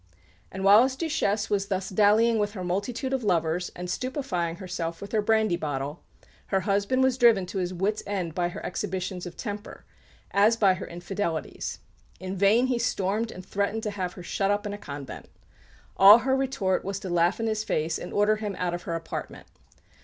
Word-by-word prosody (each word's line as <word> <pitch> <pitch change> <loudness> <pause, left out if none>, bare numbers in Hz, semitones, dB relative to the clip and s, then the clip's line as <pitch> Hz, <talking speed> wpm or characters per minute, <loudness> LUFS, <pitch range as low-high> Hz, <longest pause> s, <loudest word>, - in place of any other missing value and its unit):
And 190 - -5
while 200 +3 +8
his 260 +1 +1
Duchesse 265 -10 -1
was 200 -1 +1
thus 195 0 -2
dallying 215 +3 +4
with 205 0 -1
her 185 -4 -5
multitude 225 +9 -2
of 265 -3 -1
lovers 175 -2 0
and 180 0 -6
stupefying 185 - -2
herself 175 -3 -5
with 200 - -8
her 220 - +2
brandy 220 -4 +2
bottle, 145 -1 -4 0.5
her 195 -1 +1
husband 200 +7 +1
was 260 -1 +2
driven 230 -6 +5
to 190 +2 -4
his 180 -1 -2
wits' 195 +4 -1
end 185 -5 -2
by 175 +1 0
her - - -8
exhibitions 185 -1 -3
of 175 - -10
temper, 205 -2 -7 0.5
as 210 +3 +4
by 195 -4 +5
her 185 - -6
infidelities. 175 -1 -4 0.4
In 185 +1 -5
vain 200 +6 +4
he 250 -2 0
stormed 220 0 -1
and 185 - -10
threatened 200 +3 -1
to 210 - -2
have 185 -3 -3
her 180 - -10
shut 195 +2 -1
up 205 +1 0
in 205 - -3
a - - -5
convent. 140 -6 -8 0.7
All 200 +3 +10
her 265 +2 +1
retort 265 -9 0
was 195 0 -3
to 190 - -5
laugh 175 +3 +2
in 225 - -1
his 215 -1 -1
face 160 -4 -1
and 180 - -7
order 210 +1 +3
him 210 -2 -4
out 180 -1 -1
of 175 - -4
her 165 - -1
apartment. 165 0 -6
200 Hz, 200 wpm, -26 LUFS, 180-215 Hz, 0.7 s, All